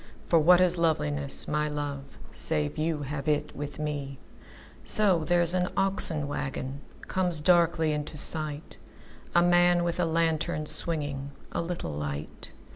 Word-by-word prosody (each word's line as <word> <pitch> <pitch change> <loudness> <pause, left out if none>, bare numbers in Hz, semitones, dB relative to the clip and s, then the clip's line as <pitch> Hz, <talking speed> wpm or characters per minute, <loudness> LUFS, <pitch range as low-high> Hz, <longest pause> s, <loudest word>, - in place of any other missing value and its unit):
For 165 - +3
what 175 +3 +6
is 180 -1 +3
loveliness, 70 - +1
my 150 0 -1
love, 145 -2 -6
Save 75 -1 +1
you 155 -1 -1
have 140 0 -5
it 150 -1 -1
with 145 0 -6
me! 145 -3 -4 0.7
So, 190 -6 +4
there's 175 0 +1
an 180 -1 +1
oxen 190 -6 +1
wagonComes 145 +5 -4
darkly 170 -2 +3
into 150 0 -4
sight:A 155 +3 0
man 175 0 +4
with 170 0 -2
a 180 - +2
lantern, 165 -1 -1
swingingA 145 -4 -4
little 170 - -4
light. 75 0 -6
155 Hz, 125 wpm, -27 LUFS, 145-175 Hz, 0.7 s, what